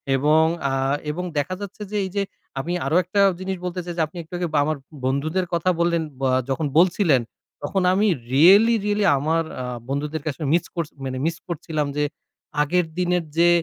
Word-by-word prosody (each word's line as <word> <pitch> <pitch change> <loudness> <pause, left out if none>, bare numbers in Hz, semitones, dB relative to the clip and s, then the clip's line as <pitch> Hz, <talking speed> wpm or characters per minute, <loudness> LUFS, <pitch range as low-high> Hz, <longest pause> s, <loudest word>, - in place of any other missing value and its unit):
এবং 150 +4 +4 0.3
আ - - -1 0.4
এবং 175 +4 -4
দেখা 145 +6 -1
যাচ্ছে 200 +1 -8
যে, 210 - -1
এইযে 200 +2 -1 0.4
আমি 170 +6 -3
আরো 145 +4 0
একটা 190 +3 +1 0.2
জিনিস 190 0 -3
বলতে 180 0 -3
চাই 175 - -4
যে, - - +2
আপনি 160 - -13
একটু 160 - -19
আগে 175 0 -1
ব - - 0
আমার 155 0 -1 0.3
বন্ধুদের 155 +8 0
কথা 170 +1 +1
বললেন 170 -1 +2 0.2
ব - - -13 0.3
যখন 135 +4 0
বলছিলেন, 170 - +4 0.4
তখন 195 - 0
আমি 205 +3 +3 0.3
রিয়েলি 200 +11 +7
রিয়েলি 210 0 +1
আমার 160 +4 +1 0.2
আ - - -3 0.3
বন্ধুদের 145 +2 -2
কাছে 155 -1 -4
মিস 170 0 +2
করছি 165 -3 -3
মানে 130 -1 -3
মিস 165 0 -1
করছিলাম 155 -3 -2
যে, 150 - +2 0.6
আগের 180 +4 +2
দিনের 180 -1 +1
যে 170 +1 +6
170 Hz, 185 wpm, -23 LUFS, 150-185 Hz, 0.6 s, রিয়েলি